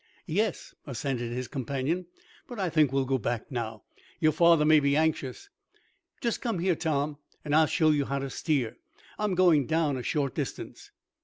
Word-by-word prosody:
"Yes," 200 +3 -1
assented 125 -2 -3
his 125 +1 -3
companion. 140 +6 -2 0.4
"But 245 - -8
I 185 -4 -1
think 155 -4 +3
we'll 135 -1 +1
go 130 0 0
back 120 +4 -3
now. 115 -3 -4 0.4
Your 155 -2 +4
father 170 -2 +5
may 155 0 +6
be 140 0 +2
anxious. 155 - -1 0.7
Just 235 -3 -1
come 230 -5 -1
here, 175 0 +1
Tom, 150 -2 -1 0.3
and 145 - -2
I'll 160 0 +5
show 155 -1 +3
you 145 -2 +1
how 140 - -2
to 135 -1 -4
steer. 135 -9 -1 0.4
I'm 210 -3 0
going 170 -7 +4
down 155 -4 +1
a - - -4
short 140 -1 -1
distance." - - -6
150 Hz, 175 wpm, -28 LUFS, 135-165 Hz, 0.7 s, may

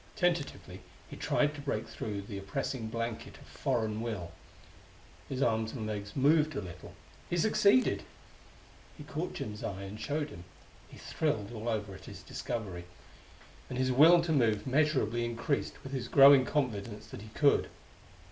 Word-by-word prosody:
Tentatively 145 - -1 0.3
he - - -9
tried 150 0 +1
to 145 - -8
break 115 -6 -2
through 105 -3 -5
the 100 0 -6
oppressing 115 +3 -3
blanket 115 0 -4
of - - -15
foreign 110 -4 -1
will; 105 -8 -4 1.0
his 135 0 -1
arms 110 -1 +1
and 115 -5 -4
legs 100 -1 -5
moved 150 +2 +3
a - - -1
little; 90 -3 -9 0.3
he 175 - 0
succeeded! 215 +6 +4 1.0
He 150 - -9
caught 155 +4 -4
Jim's 105 0 -5
eye 100 0 -4
and 100 +2 -8
showed 150 0 -2
him. 85 - -10 0.4
He - - -14
thrilled 115 -10 -2
all 115 +1 -4
over 105 -3 -2
at - - -12
his - - -10
discovery, 95 -7 -5 0.8
and 125 - -4
his 130 0 +1
will 165 +6 +7
to 170 - -1
move 115 -8 +2
measurably 130 -5 +2
increased 120 +4 -2
with 135 - -8
his 125 -3 -3
growing 135 0 +8
confidence 110 -7 -2
that - - -9
he 110 - -10
could. 145 -1 +4
120 Hz, 160 wpm, -31 LUFS, 105-145 Hz, 1.0 s, growing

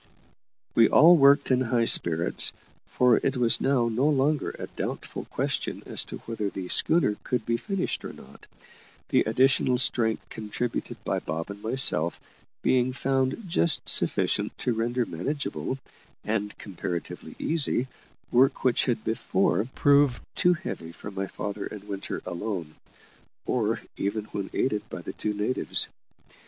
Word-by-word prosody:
We 115 - +5
all 170 +4 +7
worked 140 -2 +5
in 130 0 +3
high 120 -2 +1
spirits, 85 -5 +4 0.3
for 125 -2 +3
it 135 -1 -1
was 120 -2 +4
now 130 -3 +2
no 125 +6 +1
longer 145 +1 +1
a - - -5
doubtful - - -5
question - - -2
as - - +1
to - - -7
whether 110 -3 -3
the 95 -2 -6
schooner 160 -11 +2
could 125 -3 -2
be 115 - +1
finished 195 - -3
or - - -6
not, 65 - -15 0.6
the - - +3
additional 130 +2 +3
strength 115 -3 0
contributed 110 +2 -4
by - - -1
Bob 80 +5 -4
and 100 0 -10
myself 105 - +1 0.4
being 130 0 +2
found 135 - 0
just 170 -2 0
sufficient - - +2
to 125 - -1
render 120 +2 -1
manageable, 135 - -3 0.5
and 105 -1 -2
comparatively 90 -3 -6
easy, 150 -5 0 0.5
work 130 +3 +3
which 125 -2 +2
had 120 -4 -1
before 105 -1 0
proved 140 -3 +4
too 180 0 +3
heavy 85 - -6
for 100 +4 -9
my 95 0 -3
father 100 +1 -5
and 105 -2 -9
Winter 100 -1 -5
alone, 85 -3 -4 0.7
or 115 -2 0 0.2
even 105 +2 -2
when 100 -1 -3
aided 105 -5 0
by - - -7
the - - -6
two 105 -1 -3
natives. 105 +5 +1
115 Hz, 145 wpm, -26 LUFS, 105-135 Hz, 0.7 s, all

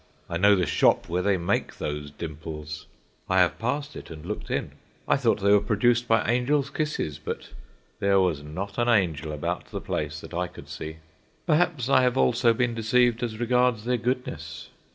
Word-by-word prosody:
I 85 - -2
know 100 +3 +6
the 90 -2 +1
shop - - +3
where 90 +2 0
they 100 0 +2
make 85 0 -1
those 75 0 -4
dimples; 75 0 -7 0.4
I 95 - +2
have 90 -2 +2
passed 145 +5 -2
it - - -9
and 80 -1 -9
looked 105 +4 -5
in. - - -2 0.4
I - - +4
thought 120 -6 +1
they 100 +1 +4
were 105 - +7
produced 120 +3 +2
by 115 -1 +2
angels' 130 +4 +1
kisses, 150 - -2
but 75 - -6 0.5
there 100 0 +3
was 90 -6 +1
not 95 +9 -6
an 120 0 +2
angel 80 -8 +1
about 75 - -3
the - - -6
place, 75 +1 -3
that - - -11
I 90 +1 -1
could 90 - -13
see. 80 +1 -6 0.5
Perhaps 155 -5 +2
I 130 -1 +5
have 125 0 +2
also 120 -1 +4
been 120 +1 0
deceived 120 +1 +2
as 115 -3 -3
regards 125 -2 +2
their 125 0 +1
goodness. 110 - -4
105 Hz, 190 wpm, -26 LUFS, 85-125 Hz, 0.5 s, were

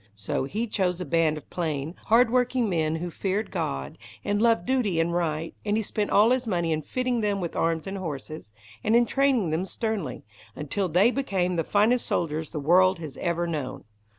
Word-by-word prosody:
So 105 +5 -2
he 210 +11 -2
chose 185 -5 -1
a 180 - -4
band 165 -2 +2
of 150 - -11
plain, 155 -3 -2
hard 230 +1 +4
working 250 -1 +2
men 160 -4 0
who 175 +2 -4
feared 200 +5 -2
God, 70 0 -3 0.3
and 205 0 0
loved 230 -6 +3
duty 235 -10 +1
and 165 +1 +1
right, 165 -2 -1
and 210 0 0
he 220 - 0
spent 210 0 -2
all 215 +4 +5
his 255 -1 +1
money 170 -5 0
in 155 0 0
fitting 250 - -1
them 205 -2 0
with 175 -3 -4
arms 165 -1 0
and 195 0 -5
horses, 155 - -6 0.3
and 220 - +3
in 240 0 +5
training 260 - +2
them 160 +3 0
sternly, 195 - -3 0.3
until 180 +6 -2
they 190 +9 +4
became 190 -10 -1
the 165 - +1
finest 220 +8 +2
soldiers 160 -1 -1
the 155 - -4
world 185 +5 +4
has 155 -4 -8
ever 170 0 -1
known. 155 -6 -4
180 Hz, 200 wpm, -26 LUFS, 160-220 Hz, 0.3 s, all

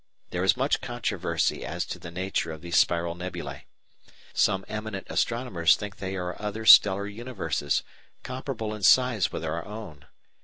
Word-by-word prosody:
There 90 +1 -1
is 95 - +4
much 135 +3 +1
controversy 120 -2 -1
as - - -3
to - - -6
the 85 - -8
nature 90 -1 -2
of 80 -1 -8
these 85 0 -4
spiral 85 0 +2
nebulæ. 85 -6 -6 0.7
Some 95 0 +2
eminent 105 -2 -5
astronomers 115 -9 +2
think 105 -2 -7
they 95 0 -4
are 90 +1 -4
other 105 +1 -4
stellar 100 -2 +8
universes, 100 - -2 0.4
comparable 125 -4 -4
in 105 - -7
size 110 +1 +4
with 80 - -4
our 80 +1 -2
own. 105 -10 -9
95 Hz, 155 wpm, -27 LUFS, 85-110 Hz, 0.7 s, stellar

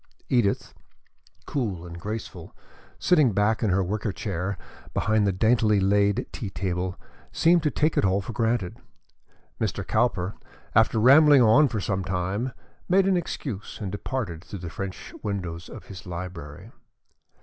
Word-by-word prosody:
Edith, 115 -6 +1 0.7
cool 100 - -3
and 85 0 -8
graceful, 105 +4 -6 0.4
sitting 150 - +3
back 105 +3 +2
in 110 - +1
her 95 +1 +2
wicker 105 +3 -2
chair 95 0 -3 0.4
behind 105 -1 +2
the - - +3
daintily 110 +1 +3
laid 100 +1 +2
tea 105 - -5
table, 90 0 -3 0.3
seemed 170 +1 +4
to 150 - +1
take 150 +2 +1
it - - +1
all 95 0 +3
for 100 +4 -6
granted. 110 -4 -1 0.8
Mr. - - -2
Cowper, 105 -4 +1 0.4
after 110 +1 +4
rambling 140 +3 +7
on 135 +7 +6
for 110 -4 -3
some 95 -1 -1
time, 95 +7 -2 0.4
made 190 +1 +4
an 195 -1 +3
excuse 135 - -4
and 100 -3 -4
departed 100 -5 -4
through 100 - -8
the 85 -2 -7
French 95 -1 -6
windows 90 -4 -4
of - - -10
his 95 -2 -10
library. 85 -4 -7
100 Hz, 150 wpm, -26 LUFS, 95-120 Hz, 0.8 s, rambling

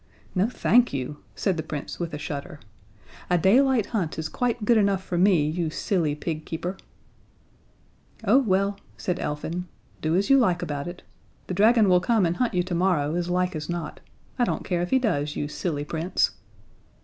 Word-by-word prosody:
"No, 195 +4 +2
thank 245 -1 +3
you," 140 +2 -3 0.2
said 190 -4 0
the - - -1
Prince, 150 -2 -6
with 170 -1 -3
a 150 - -4
shudder. 150 +2 -6 0.7
"A 180 - +4
daylight 240 - +4
hunt 180 -8 -1
is 160 -1 -3
quite 240 0 -1
good 235 +1 +5
enough 200 -3 +2
for 180 - -4
me, 175 -4 +4
you 165 +1 -1
silly 155 -2 0
pig 155 0 -4
keeper." 175 +4 -4 1.5
"Oh, 225 +6 +5
well," 200 -4 +1 0.2
said 180 -1 -2
Elfin, 165 +4 -3 0.3
"do 160 +1 +1
as 195 +2 +2
you 275 0 +6
like 180 -7 +2
about 145 -3 -4
it 175 0 -8 0.4
the - - -4
dragon 215 +3 +5
will 180 -1 +5
come 215 +1 +2
and 170 +1 0
hunt 245 -5 0
you 180 - +2
tomorrow, 175 -4 +1
as 175 0 -1
likely 180 -1 0
as 150 - -8
not. 170 -3 -4 0.4
I - - +4
don't - - -1
care 175 -2 0
if 175 - -2
he 265 - +4
does, 150 - 0
you 145 - -2
silly 150 -1 -3
Prince." 170 +4 0
180 Hz, 185 wpm, -25 LUFS, 160-200 Hz, 1.5 s, you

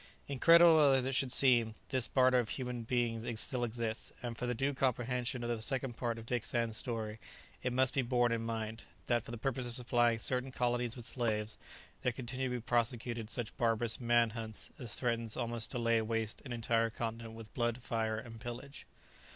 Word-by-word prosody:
Incredible 165 +4 +7
as 130 -1 +3
it 135 - -1
should 130 -1 +1
seem, 120 -5 +4
this 130 -3 +1
barter 130 -1 +4
of 120 -2 -1
human 125 -2 -3
beings 115 -1 -1
still 125 0 +2
exists, 115 -1 -2
and 120 -1 -3
for 125 +2 -3
the 125 - 0
due 135 +4 0
comprehension 125 -1 -1
of 120 - -2
the 115 -2 -2
second 130 0 -2
part 120 -1 -2
of 115 - -8
Dick 120 -1 -1
Sands' 115 -2 -1
story 110 -3 -4 0.4
it 125 - -1
must 130 +1 +2
be 135 - +2
borne 120 -1 +2
in 115 -1 0
mind, 115 -1 -4 0.2
that 120 -1 +2
for - - -11
the 120 - -5
purpose 130 +1 -2
of 120 - -1
supplying 120 -1 +2
certain 125 +3 -1
colonies 120 -1 0
with 120 -3 -7
slaves, 110 -3 -1 0.5
there 125 - +1
continue 130 +2 -3
to 125 - -2
be 120 - -3
prosecuted 115 -1 0
such 115 -1 -4
barbarous 115 -1 +1
"man 120 -1 +3
hunts" 110 -1 -4
as 120 -5 -3
threaten 115 -2 -1
almost 120 -2 -2
to - - -3
lay 115 -1 +2
waste 110 -1 -2
an 130 - -7
entire 115 -1 +1
continent 115 0 -5
with 115 -1 -11
blood, 120 -1 0
fire, 115 -2 -1
and 115 0 -8
pillage. 125 +4 -7
120 Hz, 200 wpm, -34 LUFS, 115-125 Hz, 0.5 s, Incredible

